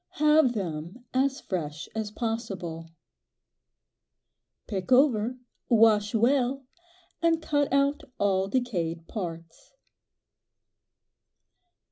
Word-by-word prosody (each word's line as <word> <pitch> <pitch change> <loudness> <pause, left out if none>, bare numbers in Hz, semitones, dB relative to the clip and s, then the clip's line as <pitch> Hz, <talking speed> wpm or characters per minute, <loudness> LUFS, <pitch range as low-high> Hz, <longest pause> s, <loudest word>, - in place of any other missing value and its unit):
Have 300 -4 +4
them 180 +3 -5
as 265 +1 +1
fresh 155 -5 -4
as 220 -1 -3
possible. 195 -8 -4 1.8
Pick 200 +3 -5
over, 250 -3 +4 0.3
wash 215 -2 +4
well, 260 +3 +2 0.6
and 335 -1 +3
cut 290 -3 0
out 280 +1 +2 0.2
all 195 -1 +1
decayed 175 -9 -2
parts. 165 -5 -7
225 Hz, 80 wpm, -27 LUFS, 180-260 Hz, 1.8 s, Have